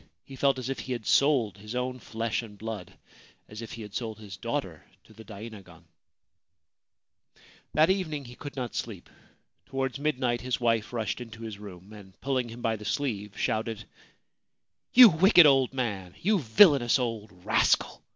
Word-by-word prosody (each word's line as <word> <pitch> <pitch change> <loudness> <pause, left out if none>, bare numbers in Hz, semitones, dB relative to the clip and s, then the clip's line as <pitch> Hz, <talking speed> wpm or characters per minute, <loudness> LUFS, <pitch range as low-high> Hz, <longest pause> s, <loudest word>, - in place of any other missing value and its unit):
He 135 - -11
felt 135 0 +2
as 130 -1 -5
if 135 -1 -3
he 130 - -4
had 120 -3 -6
sold 130 -9 +2
his 105 +4 -8
own 125 0 -2
flesh 115 0 -3
and 105 -3 -12
blood 110 -3 -6 0.3
— - - -28
as 105 +1 -9
if 115 - -8
he 115 - -7
had 105 -1 -11
sold 110 -3 -4
his 105 -3 -10
daughter - - -4
— - - -42
to - - -19
the 110 +1 -13
dainagon. 100 -5 -11 1.9
That 155 +4 +5
evening 160 -7 -2
he 120 - -11
could 145 +3 -9
not 125 -3 -4
sleep. 105 -7 -6 0.6
Towards 135 0 -3
midnight 125 -5 0
his 125 0 -2
wife 115 -3 +1
rushed 115 -1 -3
into 115 -1 -9
his 110 -3 -7
room, 100 0 -11
and, 95 -3 -14
pulling 130 -3 -1
him 120 +1 -10
by 110 -1 0
the 105 - -11
sleeve, 105 -6 -3
shouted: 110 0 -1
c - - -13 1.1
You 250 -1 +12
wicked 175 +1 +6
old 135 -3 +4
man! 100 -9 -4
You 205 +2 +2
villainous 135 - +5
old 115 -4 -3 0.2
rascal - - +2
115 Hz, 180 wpm, -28 LUFS, 105-135 Hz, 1.9 s, You